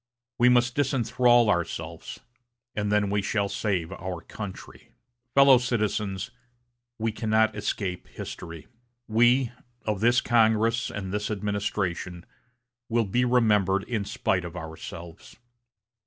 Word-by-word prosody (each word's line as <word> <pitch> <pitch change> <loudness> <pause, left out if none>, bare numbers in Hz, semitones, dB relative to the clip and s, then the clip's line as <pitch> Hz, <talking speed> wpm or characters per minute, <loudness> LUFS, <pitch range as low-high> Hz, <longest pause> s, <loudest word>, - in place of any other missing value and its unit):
We 125 +1 +6
must 125 0 +3
disenthrall 120 -3 +3
ourselves, 85 -5 -3 0.5
and 105 0 -1
then 105 -1 +2
we 100 0 +1
shall 100 0 0
save 95 -6 -1
our 95 -3 -5
country. 100 +2 -9 0.5
"Fellow 140 -2 +7
citizens, 105 -5 -2 0.7
we 115 0 -1
cannot 110 0 +1
escape 100 -3 -3
history. 85 -2 -8 0.4
We, 120 +3 +3 0.3
of 105 -3 -1
this 120 +3 +4
Congress 115 0 +2
and 95 -2 -5
this 105 0 -2
administration, 100 -4 -3 0.6
will 115 0 +2
be 120 +6 +1
remembered 105 -6 +3
in 115 -5 -2
spite 95 -2 -1
of 85 0 -7
ourselves. 80 +1 -9
105 Hz, 115 wpm, -26 LUFS, 95-120 Hz, 0.7 s, Fellow